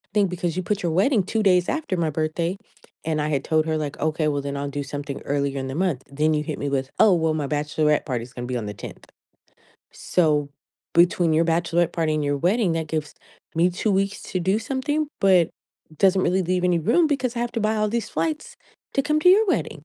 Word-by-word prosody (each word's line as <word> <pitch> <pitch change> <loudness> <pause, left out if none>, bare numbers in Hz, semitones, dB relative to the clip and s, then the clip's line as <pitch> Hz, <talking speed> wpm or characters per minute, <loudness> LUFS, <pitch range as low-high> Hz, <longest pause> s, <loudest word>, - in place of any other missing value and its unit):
thing 200 -2 +4
because 175 -1 -3
you 185 - -1
put 205 +2 -1
your 170 - 0
wedding 205 - +3
2 220 +3 -1
days 180 -2 +3
after 315 -12 -2
my 165 -2 +1
birthday, 160 +4 -2 0.5
and 155 -2 0
I 150 - -1
had 140 -3 0
told 155 0 +1
her 155 0 0
like, 150 -2 -4
"Okay, 155 0 0
well, 145 -1 -1
then 140 0 -4
I'll 140 0 -3
do 145 0 -4
something 140 0 -6
earlier 140 -1 -1
in 130 - -4
the 135 - -5
month." 170 -7 0
Then 155 +2 +1
you 150 0 0
hit - - -4
me 145 - -2
with, 135 -1 -1
"Oh, 215 -4 +6
well 160 -2 +1
my 150 -2 -2
bachelorette 150 +1 0
party 125 -5 -2
is 125 - -13
going 120 0 -6
to - - -5
be 125 - -1
on 110 - -4
the 105 - -5
10th." - - -10 0.9
So, 150 -5 +1 0.5
between 170 -1 +4
your 165 +2 +3
bachelorette 170 0 +1
party 160 -2 0
and 150 -1 -1
your 145 0 0
wedding, 185 - +2
that 165 -1 -2
gives 155 -2 -3 0.4
me 175 +2 +3
2 200 +4 -1
weeks 195 +1 0
to 185 - -3
do 190 +5 +1
something, 280 +6 -1
but 185 -4 +4 0.5
doesn't 190 -1 +4
really 185 +1 +2
leave 180 +1 0
any 175 -2 +3
room 325 - +3
because 260 -4 -1
I - - -1
have 240 0 -2
to 230 - -2
buy 215 +1 +1
all 215 0 +1
these 235 +1 -2
flights 310 -2 -3 0.4
to 275 - +3
come 305 +1 +1
to 360 - +5
your 425 +3 +5
wedding. 155 - -2
165 Hz, 240 wpm, -23 LUFS, 150-195 Hz, 0.9 s, Oh